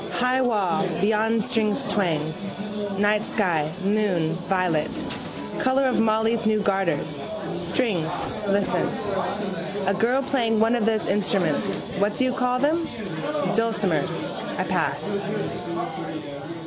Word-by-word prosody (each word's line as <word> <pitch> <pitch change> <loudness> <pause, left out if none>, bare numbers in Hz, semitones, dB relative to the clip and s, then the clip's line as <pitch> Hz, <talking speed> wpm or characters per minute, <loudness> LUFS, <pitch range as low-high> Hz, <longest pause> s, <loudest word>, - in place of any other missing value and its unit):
High 250 +1 +2
wall: 200 -7 +2
beyond 220 +2 +2
strings 220 -3 +1
twanged. 170 0 -1 0.5
Night 210 +1 +3
sky, 165 -7 +1
moon, 195 -6 +2 0.2
violet, 180 -5 +2 0.7
colour 260 +1 +3
of 260 -1 +2
Molly's 225 0 +2
new 215 -1 +3
garters. 180 -6 0 0.3
Strings. 180 -2 0 0.4
Listen. 200 0 +2 1.0
A 195 - +3
girl 240 +7 +2
playing 235 -5 +1
one 225 +2 +4
of 225 -2 +1
those 220 -1 +2
instruments 185 - +1 0.2
what 205 +1 +2
do - - +2
you 255 0 +2
call 250 -1 +1
them: 315 +5 +1 0.6
dulcimers. 225 -1 +1 0.3
I - - +1
pass. 200 -1 -1
210 Hz, 110 wpm, -24 LUFS, 185-230 Hz, 1.0 s, one